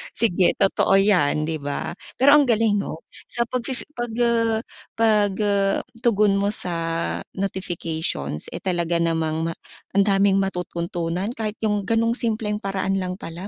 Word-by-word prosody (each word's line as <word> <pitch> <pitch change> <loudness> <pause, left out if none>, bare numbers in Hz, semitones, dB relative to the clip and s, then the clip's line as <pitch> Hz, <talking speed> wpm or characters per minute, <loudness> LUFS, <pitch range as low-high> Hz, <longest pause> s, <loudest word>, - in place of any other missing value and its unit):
Sige 185 -5 +3
totoo 195 0 +3
yan 180 -7 +3
'di 160 0 -2
ba? 140 0 -3 0.3
Pero 280 +3 +7
ang 290 -2 +5
galing 220 -3 +3
'no. 165 -4 -5 0.3
Sa 235 - +1
pag 250 +1 -2
fifi 260 -2 -4
pag 240 -3 -4
uh 230 -2 +2 0.4
pag, 210 -3 +3
uh, 200 -1 +2 0.2
tugon 210 -4 +3
mo 200 +1 +1
sa 180 -4 -1 0.6
notifications, 165 - -3
eh, - - -5
talaga 175 -2 0
namang 160 0 0
ma - - -5 0.4
ang 200 - +5
daming 195 0 +3
matututunan 175 +1 -3
kahit 215 -1 -3
yung 210 -1 +1
ganung 230 +1 +2
simpleng 215 -3 -1
paraan 195 0 -1
lang 180 0 -3
pala 170 +4 -7
195 Hz, 150 wpm, -23 LUFS, 175-220 Hz, 0.6 s, Pero